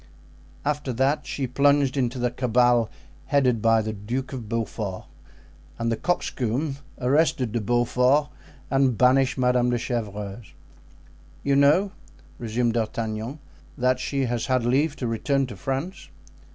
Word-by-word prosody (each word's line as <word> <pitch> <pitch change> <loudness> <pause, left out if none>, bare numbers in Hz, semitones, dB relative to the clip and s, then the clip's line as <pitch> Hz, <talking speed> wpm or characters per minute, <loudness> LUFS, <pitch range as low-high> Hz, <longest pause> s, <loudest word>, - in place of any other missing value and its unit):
After 145 -2 -1
that 135 +5 0
she 135 - -2
plunged 140 +1 +2
into 130 -2 0
the 125 -1 0
cabal 120 -2 +2 0.4
headed 130 -6 +2
by 115 0 +4
the 110 0 -3
Duke 120 +7 -4
of 120 -5 -6
Beaufort; 110 -4 -3 0.7
and 115 0 -1
the - - +1
'coxcomb' 135 -1 -1 0.2
arrested 130 -2 +2
De 115 0 -1
Beaufort 125 +6 +2 0.4
and 135 -4 +2
banished 130 +1 +3
Madame 125 -1 +2
de 120 - +1
Chevreuse." 105 -3 -5 0.9
"You 140 0 +2
know," 150 +8 +4 0.5
resumed 115 0 0
D'Artagnan, 115 +2 -3 0.4
"that 125 -1 +2
she 135 0 -1
has 120 +1 -2
had 130 -3 +1
leave 140 +5 +2
to 130 - -4
return 135 +4 0
to 125 - -8
France?" 135 - -4
125 Hz, 135 wpm, -25 LUFS, 115-135 Hz, 0.9 s, by